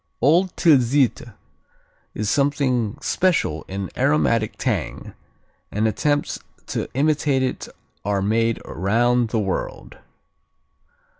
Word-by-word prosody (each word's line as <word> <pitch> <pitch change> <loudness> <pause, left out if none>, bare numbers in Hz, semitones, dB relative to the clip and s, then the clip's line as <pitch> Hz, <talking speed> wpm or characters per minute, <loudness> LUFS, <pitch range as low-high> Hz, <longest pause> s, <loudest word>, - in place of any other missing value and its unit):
Old 170 +8 +3
Tilsiter 130 - +3 0.8
is 105 - -2
something 130 -4 +1
special 170 - +1
in 95 0 -5
aromatic 125 -5 +1
tang, - - -3 0.6
and 110 +2 +1
attempts 145 +6 0 0.3
to - - -3
imitate 145 -1 +2
it 130 - -3 0.4
are 100 -1 0
made 115 +2 +1
around 115 +6 +1
the 115 - -1
world. 100 -3 -4
120 Hz, 95 wpm, -22 LUFS, 110-145 Hz, 0.8 s, Old